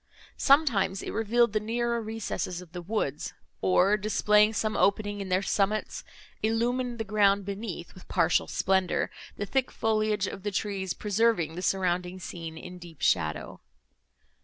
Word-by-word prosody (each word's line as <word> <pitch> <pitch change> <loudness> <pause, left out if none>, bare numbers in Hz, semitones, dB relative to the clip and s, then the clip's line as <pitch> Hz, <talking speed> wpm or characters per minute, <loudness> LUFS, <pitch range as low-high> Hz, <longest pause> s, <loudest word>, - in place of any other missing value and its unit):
Sometimes, 235 -10 +3
it - - -4
revealed 225 +1 +2
the 215 - +2
nearer 235 +2 -1
recesses 215 -5 -4
of 180 -3 -12
the 175 0 -6
woods, 170 -7 -3 0.3
or, 180 - +4
displaying 210 0 +3
some 215 0 -1
opening 205 0 +1
in 195 - -5
their 185 +2 +2
summits, 205 +2 0 0.4
illumined 240 +2 0
the 225 - -2
ground 200 -1 +3
beneath 200 -3 -5
with 185 - -15
partial 170 -2 +2
splendour, 190 -1 +1 0.3
the 205 - -2
thick 265 +4 0
foliage 215 -2 0
of 195 - -6
the 205 - -2
trees 195 -2 -2
preserving 210 -5 +1
the 180 - -5
surrounding 180 -1 0
scene 165 -2 -7
in 180 +2 -9
deep 170 -3 -12
shadow. 80 -4 0
200 Hz, 150 wpm, -28 LUFS, 180-220 Hz, 0.4 s, or